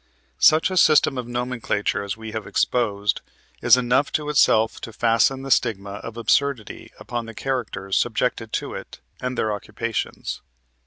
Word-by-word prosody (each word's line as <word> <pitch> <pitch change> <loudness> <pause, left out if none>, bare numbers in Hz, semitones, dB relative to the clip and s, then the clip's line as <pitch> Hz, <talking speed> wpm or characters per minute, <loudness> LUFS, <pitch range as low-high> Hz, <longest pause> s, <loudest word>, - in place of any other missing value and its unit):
Such 160 +4 +5
a 185 - -2
system 155 -5 +5
of 120 - -5
nomenclature 120 -4 -2
as 100 +1 -4
we 110 0 -8
have 110 -2 -5
exposed 105 -4 0 0.4
is - - +6
enough 125 +3 +2
of 150 -1 -6
itself 115 -6 +3
to 115 - -7
fasten 115 +4 +2
the 135 - -5
stigma 100 -5 +1
of 115 0 -8
absurdity 125 -1 0
upon 120 -1 -5
the 115 - -9
characters 105 -8 -2
subjected 115 -1 0
to - - -2
it, - - -9 0.2
and 125 -1 -3
their 110 -1 0
occupations. 105 +2 -4
115 Hz, 155 wpm, -23 LUFS, 110-125 Hz, 0.4 s, is